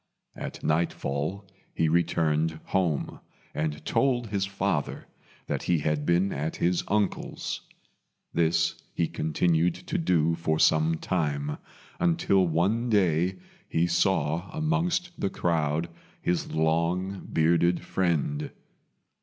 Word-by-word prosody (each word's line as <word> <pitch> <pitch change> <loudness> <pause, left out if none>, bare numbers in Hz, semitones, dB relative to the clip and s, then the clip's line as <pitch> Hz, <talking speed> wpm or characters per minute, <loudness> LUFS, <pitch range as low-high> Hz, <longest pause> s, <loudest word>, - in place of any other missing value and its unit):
At - - -7
nightfall 80 +3 -1 0.3
he 80 - +2
returned 80 -1 +1
home, 90 -6 -1 0.3
and 75 -1 -3
told 125 -3 +2
his 100 -1 0
father 100 0 -2 0.4
that - - -2
he 85 - +2
had 75 -1 -1
been 90 +3 +2
at 75 +3 -3
his 90 +1 +1
uncle's. 105 -1 -1 0.7
This 85 0 +1
he 85 - +1
continued 85 +1 +1
to 185 +1 -3
do 85 - +2
for 80 -1 0
some 80 +1 +4
time, 75 -5 -1 0.4
until 165 - +3
one 100 +9 +1
day 90 -3 +2 0.3
he 80 +1 +2
saw 85 -1 +1
amongst 170 +2 0
the 100 - 0
crowd 80 -2 0 0.3
his 90 0 -1
long 85 +5 0
bearded 85 +2 +3
friend. 80 -5 0
85 Hz, 110 wpm, -27 LUFS, 80-95 Hz, 0.7 s, some